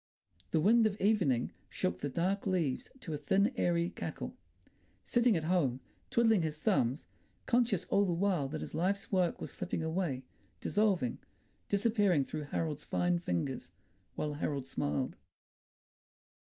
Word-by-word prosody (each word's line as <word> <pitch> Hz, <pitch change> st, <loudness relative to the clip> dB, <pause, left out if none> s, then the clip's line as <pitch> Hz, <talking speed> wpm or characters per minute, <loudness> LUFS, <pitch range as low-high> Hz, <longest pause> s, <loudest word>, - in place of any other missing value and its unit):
The -, -, +2 dB
wind 220 Hz, +6 st, +5 dB
of 210 Hz, -1 st, -4 dB
evening 180 Hz, -, +2 dB, 0.2 s
shook 90 Hz, 0 st, -2 dB
the 145 Hz, -, -2 dB
dark 185 Hz, +8 st, 0 dB
leaves 170 Hz, -9 st, 0 dB
to 165 Hz, -8 st, -5 dB
a 150 Hz, -, -3 dB
thin 200 Hz, -, +2 dB
airy 170 Hz, 0 st, +1 dB
cackle. -, -, -5 dB, 0.7 s
Sitting 240 Hz, -4 st, +3 dB
at 160 Hz, -, -2 dB
home, 155 Hz, -7 st, +1 dB, 0.3 s
twiddling 225 Hz, -4 st, +4 dB
his 155 Hz, -2 st, -2 dB
thumbs, 150 Hz, -, +1 dB, 0.4 s
conscious 235 Hz, -6 st, +2 dB
all 200 Hz, -, +3 dB
the 180 Hz, -, 0 dB
while 175 Hz, -4 st, +1 dB
that 155 Hz, +2 st, -5 dB
his -, -, -6 dB
life's 195 Hz, +4 st, 0 dB
work 185 Hz, -3 st, +2 dB
was -, -, -5 dB
slipping 180 Hz, -3 st, -3 dB
away, 160 Hz, -5 st, -1 dB, 0.4 s
dissolving, 190 Hz, -, +1 dB, 0.5 s
disappearing 200 Hz, -, +3 dB
through 150 Hz, +2 st, -5 dB
Harold's 150 Hz, 0 st, -2 dB
fine 175 Hz, 0 st, +1 dB
fingers, 130 Hz, -, -2 dB, 0.5 s
while 150 Hz, -1 st, -2 dB
Harold 145 Hz, -2 st, -2 dB
smiled.... 75 Hz, -, -2 dB
175 Hz, 140 wpm, -33 LUFS, 145-200 Hz, 0.7 s, wind